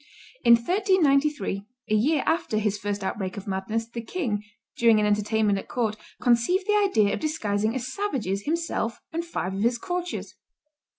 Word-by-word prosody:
In 235 - +8
1393, 295 - +2 0.3
a - - +1
year 275 +8 +3
after 320 -9 0
his 210 -1 0
first 205 0 -3
outbreak 190 0 -3
of 200 - -6
madness, 200 +4 -2
the 235 0 -6
king, 225 - -2 0.3
during 230 -2 +5
an 210 - +2
entertainment 210 0 +2
at - - -10
court, 225 -4 -1 0.2
conceived 250 - +2
the 420 - +2
idea 380 - +3
of - - -2
disguising 220 -8 -1
as 260 +1 -4
savages 225 - -2
himself 315 -8 -1
and 335 +1 -1
five 190 - -3
of 195 - -3
his 235 +2 +2
courtiers. 355 +6 -4
230 Hz, 165 wpm, -26 LUFS, 210-310 Hz, 0.3 s, In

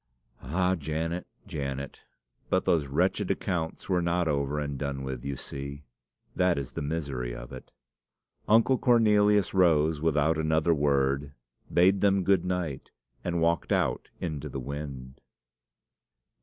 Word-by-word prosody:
"Ah, 90 +7 +1
Janet, 80 +1 -3 0.2
Janet! 70 -1 -5 0.5
but - - +1
those 80 -4 +2
wretched 70 - 0
accounts 80 -4 -2
were 90 -2 +2
not 85 0 +1
over 70 -1 0
and 70 -1 -2
done 70 -2 -3
with, 65 -2 -5
you 70 0 -3
see. 70 +2 -7 0.5
That 90 -3 +2
is 70 -2 -4
the - - -5
misery 70 -5 -3
of - - -9
it." - - -10 0.8
Uncle 115 +4 +4
Cornelius 105 -4 +4
rose 80 -4 +3
without 80 0 +2
another 80 +1 +2
word, 70 -1 +1 0.4
bade 95 +3 +4
them 100 -1 +3
good 95 -2 +3
night, 90 -6 -3 0.3
and 85 -1 -1
walked 85 0 +1
out - - 0
into 75 -5 -4
the 70 - -5
wind. 70 -1 -7
80 Hz, 135 wpm, -28 LUFS, 70-90 Hz, 0.8 s, Uncle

